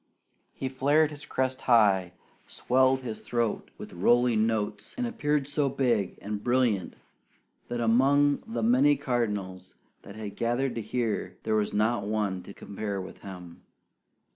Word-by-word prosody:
He 135 - -3
flared 145 +4 +2
his 145 -1 -9
crest 130 0 -1
high, 100 -6 +4 0.3
swelled 130 +1 +2
his 120 -4 -6
throat 120 -2 -2
with - - -9
rolling 115 +4 +3
notes, 105 -1 -3
and 250 - -1
appeared 150 - -1
so 145 -1 0
big 120 -8 0
and 105 0 -4
brilliant 120 -6 +1 0.7
that 120 0 -3
among 140 +5 +4
the 225 - -3
many 265 +6 +4
cardinals 100 - -3 0.3
that 100 - -12
had 105 -2 -7
gathered 120 +3 0
to 115 - -3
hear, 115 -1 -2
there 110 - -1
was 105 -1 +1
not 110 +1 +1
one 105 -3 -1
to 90 - -11
compare 100 -1 -5
with 95 - -9
him. 90 -3 -10
115 Hz, 145 wpm, -28 LUFS, 105-130 Hz, 0.7 s, high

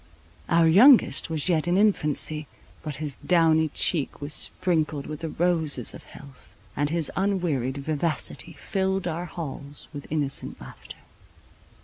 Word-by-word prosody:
Our 170 -1 +4
youngest 225 - +6
was 160 -1 -2
yet 170 -2 +1
in 175 +1 +2
infancy; 155 -6 +1 0.3
but 150 -3 -6
his 150 -2 -5
downy 160 -2 +3
cheek 150 0 -1
was 145 +1 -5
sprinkled 155 -6 0
with 155 -1 -7
the 165 -1 -4
roses 160 -7 +1
of - - -12
health, 140 -3 -15 0.2
and 145 +1 0
his 165 -1 0
unwearied 170 -10 -1
vivacity 155 +3 -2
filled 190 +4 -2
our 170 +1 -3
halls 145 -4 -8
with 145 -1 -8
innocent 145 -3 -1
laughter. - - -12
160 Hz, 135 wpm, -25 LUFS, 145-175 Hz, 0.3 s, youngest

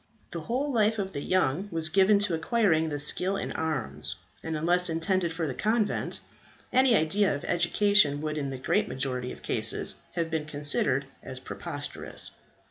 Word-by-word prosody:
The 170 - -5
whole 260 - -2
life 220 -1 +2
of 195 -2 -3
the 140 - -5
young 185 +2 0
was 165 -1 -1
given 195 +4 +4
to 185 - -3
acquiring 160 -4 +1
skill 180 +7 +2
in - - -4
arms; 155 -7 -2 0.3
and 160 -1 -4
unless 175 +3 +2
intended 170 +2 0
for 165 0 -3
the 140 - -3
convent, 215 - -1 0.5
any 255 -2 +5
idea 195 +3 +2
of 140 - -7
education 175 -3 +3
would 155 0 -3
in 145 -2 -3
the 135 - -5
great 130 - 0
majority 125 -1 -3
of - - -12
cases - - +2 0.2
have 165 -1 -2
been 160 -2 -2
considered 145 -2 +3 0.2
as 130 -1 -6
preposterous. - - -4
165 Hz, 165 wpm, -27 LUFS, 145-200 Hz, 0.5 s, any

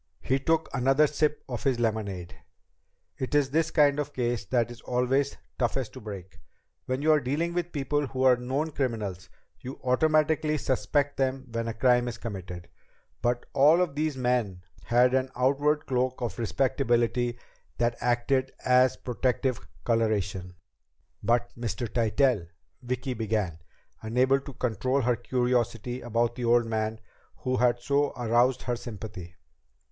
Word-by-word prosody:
He 135 +1 +1
took 160 +3 +1
another 135 +3 +4
sip 150 0 0
of 120 -4 -5
his 130 -3 +1
lemonade. 105 -6 -2 0.8
"It 130 +2 -2
is 140 -2 +3
this 160 +2 +2
kind 145 -2 +3
of 145 0 -3
case 120 -3 -1
that 120 +2 0
is 120 - -11
always 130 +3 0 0.2
toughest 125 0 -1
to - - -9
break. 100 -4 -9 0.5
Where 130 +1 -1
you 155 +2 +3
are 155 - +5
dealing 150 +6 -1
with 175 0 -2
people 145 0 -1
who 130 +1 -2
are 130 -1 +7
known 135 +6 -2
criminals, 105 - -3 0.3
you 130 +7 -8
automatically 155 +3 +2
suspect 140 +1 0
them 135 0 -1
when 115 0 -2
a 115 - -3
crime 125 +1 +3
is 120 -1 -4
committed. 95 -6 -7 0.5
But 120 0 0
all 150 +5 +6
of 180 -5 +1
these 150 -1 -1
men 120 -8 0 0.2
had 125 +1 +4
an 130 0 +1
outward 140 +4 +2
cloak 130 0 0
of 115 -5 -4
respectability 120 -1 +1 0.4
that 120 0 +1
acted 125 +2 +1
as 125 0 +4
protective 125 0 -1 0.2
coloration." 100 -5 0 0.7
"But 120 0 +1
Mr. 120 +1 -3
Tytell?" 115 -3 +1 0.3
Vicki 125 +1 -3
began, 105 -7 -2 0.4
unable 125 +5 +2
to 140 0 -10
control 130 +3 0
her 125 -1 +2
curiosity 125 0 -1
about 120 0 0
the 120 0 -4
old 120 0 +4
man 110 0 -2 0.4
who 130 -2 -2
had 120 -1 +3
so 140 +3 +1
aroused 120 +1 +2
her 125 - -1
sympathy. 105 -7 -8
125 Hz, 150 wpm, -27 LUFS, 115-135 Hz, 0.8 s, are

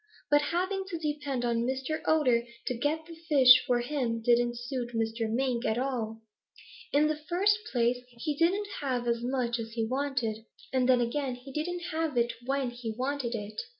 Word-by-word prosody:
"But 290 0 +6
having 370 +6 -1
to 355 -4 -4
depend 295 -5 -2
on 235 -1 +1
Mr. 265 +5 -2
Otter 255 -7 +4 0.2
to - - 0
get 300 +6 -1
the 335 - -10 0.2
fish 255 -4 +8
for 245 -1 +2
him 245 -3 -1
didn't 240 +1 +2
suit 240 -1 -4
Mr. 225 0 -1
Mink 245 0 0
at 220 - 0
all. 230 -4 -2 0.7
In 290 +2 +4
the 305 0 -1
first 400 +4 +3
place, 240 0 +2
he 250 +5 -4
didn't 370 +7 +2
have 255 -4 -1
as 235 0 +1
much 245 -1 -1
as 225 0 -6
he 225 -1 0
wanted. 250 -4 -1 0.3
And 260 -1 +2
then 250 -1 +5
again 255 +2 -1
he 255 +2 -12
didn't 350 +4 -3
have 320 -4 -1
it 235 0 +2
when 270 -2 0
he 240 -2 -5
wanted 260 -2 -1
it. 210 0 -5
255 Hz, 185 wpm, -29 LUFS, 235-295 Hz, 0.7 s, fish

